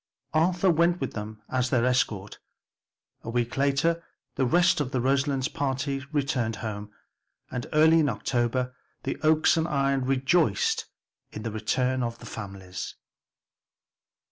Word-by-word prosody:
Arthur 175 Hz, +3 st, +3 dB
went 170 Hz, +2 st, +3 dB
with 135 Hz, -, -3 dB
them 105 Hz, 0 st, -7 dB
as 130 Hz, -1 st, 0 dB
their 120 Hz, -2 st, +2 dB
escort. 105 Hz, -6 st, 0 dB, 0.8 s
A -, -, -7 dB
week 120 Hz, 0 st, -1 dB
later 140 Hz, +5 st, +1 dB, 0.3 s
the 130 Hz, -, +1 dB
rest 175 Hz, +3 st, +4 dB
of 135 Hz, -, -2 dB
the 130 Hz, -2 st, -1 dB
Roselands 135 Hz, +1 st, +1 dB
party 135 Hz, -1 st, -2 dB
returned 135 Hz, -6 st, 0 dB
home, 105 Hz, -1 st, -5 dB, 0.6 s
and 125 Hz, -1 st, -4 dB
early 160 Hz, +1 st, +6 dB
in 150 Hz, -3 st, +3 dB
October 125 Hz, +2 st, -1 dB, 0.3 s
the -, -, -2 dB
Oaks 155 Hz, +1 st, +4 dB
and 160 Hz, 0 st, +1 dB
Ion 140 Hz, -3 st, +1 dB
rejoiced 135 Hz, -, +2 dB, 0.4 s
in 105 Hz, -, -7 dB
the 115 Hz, -, -3 dB
return 125 Hz, +4 st, 0 dB
of 115 Hz, -1 st, -2 dB
their -, -, -12 dB
families. 95 Hz, -4 st, -7 dB
130 Hz, 140 wpm, -27 LUFS, 115-150 Hz, 0.8 s, early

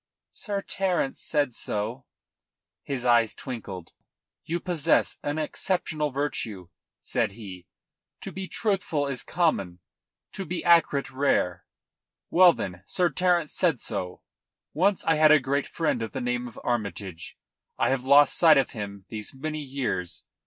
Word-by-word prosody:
"Sir 200 Hz, -2 st, -3 dB
Terence 185 Hz, -8 st, -1 dB
said 145 Hz, -5 st, 0 dB
so." 115 Hz, +5 st, -4 dB, 0.7 s
His 130 Hz, -3 st, -4 dB
eyes 120 Hz, -3 st, +4 dB
twinkled. 100 Hz, -9 st, -7 dB, 0.5 s
"You 170 Hz, +2 st, -2 dB
possess 175 Hz, -6 st, +1 dB
an 145 Hz, +1 st, -2 dB
exceptional 155 Hz, -1 st, -1 dB
virtue," 115 Hz, -, -3 dB, 0.3 s
said -, -, -1 dB
he. 95 Hz, -5 st, -10 dB, 0.5 s
"To -, -, -6 dB
be 190 Hz, 0 st, -6 dB
truthful 190 Hz, -10 st, -1 dB
is 135 Hz, -3 st, -2 dB
common; 100 Hz, -, 0 dB, 0.5 s
to 195 Hz, -, -5 dB
be 180 Hz, 0 st, -4 dB
accurate 165 Hz, -5 st, +4 dB
rare. 95 Hz, -, +1 dB, 0.7 s
Well, 180 Hz, 0 st, +8 dB
then, 90 Hz, -3 st, -5 dB
Sir 175 Hz, -1 st, +1 dB
Terence 175 Hz, -4 st, +1 dB
said 165 Hz, -9 st, +2 dB
so. 90 Hz, -3 st, -5 dB, 0.5 s
Once 195 Hz, +4 st, +2 dB
I 160 Hz, -, +3 dB
had 155 Hz, 0 st, +6 dB
a 155 Hz, -, +7 dB
great 140 Hz, +1 st, -1 dB
friend 155 Hz, -8 st, -1 dB
of 110 Hz, -, -4 dB
the 135 Hz, -, -3 dB
name 125 Hz, 0 st, -1 dB
of 120 Hz, -, -11 dB
Armytage. 100 Hz, -7 st, -4 dB, 0.4 s
I -, -, +2 dB
have 135 Hz, -1 st, 0 dB
lost 140 Hz, +1 st, +6 dB
sight 160 Hz, -3 st, +7 dB
of 135 Hz, -, +2 dB
him 100 Hz, -4 st, -7 dB
these 105 Hz, +3 st, -5 dB
many 155 Hz, +3 st, -4 dB
years. 130 Hz, -11 st, -3 dB
140 Hz, 145 wpm, -26 LUFS, 110-165 Hz, 0.7 s, Well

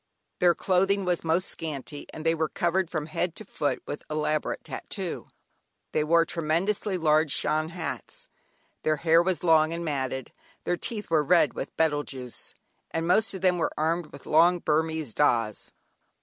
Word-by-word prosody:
Their 175 Hz, -1 st, +5 dB
clothing 195 Hz, +1 st, +2 dB
was 180 Hz, -2 st, 0 dB
most 165 Hz, +3 st, +1 dB
scanty 145 Hz, -2 st, -6 dB
and 155 Hz, -, -8 dB
they 165 Hz, -, +4 dB
were 160 Hz, -1 st, -1 dB
covered 175 Hz, 0 st, 0 dB
from 155 Hz, -4 st, -2 dB
head 165 Hz, +2 st, -2 dB
to 215 Hz, -, -8 dB
foot 145 Hz, -5 st, -2 dB
with 145 Hz, -, -5 dB
elaborate 155 Hz, 0 st, -1 dB
"tattoo." -, -, -5 dB, 0.6 s
They 155 Hz, -, +1 dB
wore 165 Hz, +2 st, +4 dB
tremendously 175 Hz, +5 st, 0 dB
large 155 Hz, -2 st, +3 dB
Shan 155 Hz, +3 st, 0 dB
hats, 170 Hz, -1 st, -5 dB, 0.5 s
their 155 Hz, -, +2 dB
hair 165 Hz, +1 st, +4 dB
was 180 Hz, -2 st, -1 dB
long 160 Hz, -1 st, +4 dB
and 170 Hz, 0 st, -4 dB
matted, 130 Hz, -3 st, -3 dB, 0.3 s
their 175 Hz, -, 0 dB
teeth 210 Hz, +1 st, -4 dB
were 160 Hz, -2 st, +4 dB
red 160 Hz, 0 st, +4 dB
with 135 Hz, -, -6 dB
betel 150 Hz, -2 st, +2 dB
juice, 130 Hz, -4 st, -8 dB, 0.3 s
and 165 Hz, 0 st, -2 dB
most 200 Hz, +3 st, +3 dB
of 190 Hz, -, -6 dB
them 180 Hz, -2 st, +3 dB
were -, -, 0 dB
armed 165 Hz, +2 st, 0 dB
with -, -, -13 dB
long 170 Hz, +3 st, +5 dB
Burmese 160 Hz, -5 st, 0 dB
"dahs" 120 Hz, -6 st, +3 dB, 0.2 s
(knives). -, -, -17 dB
160 Hz, 170 wpm, -27 LUFS, 155-175 Hz, 0.6 s, Their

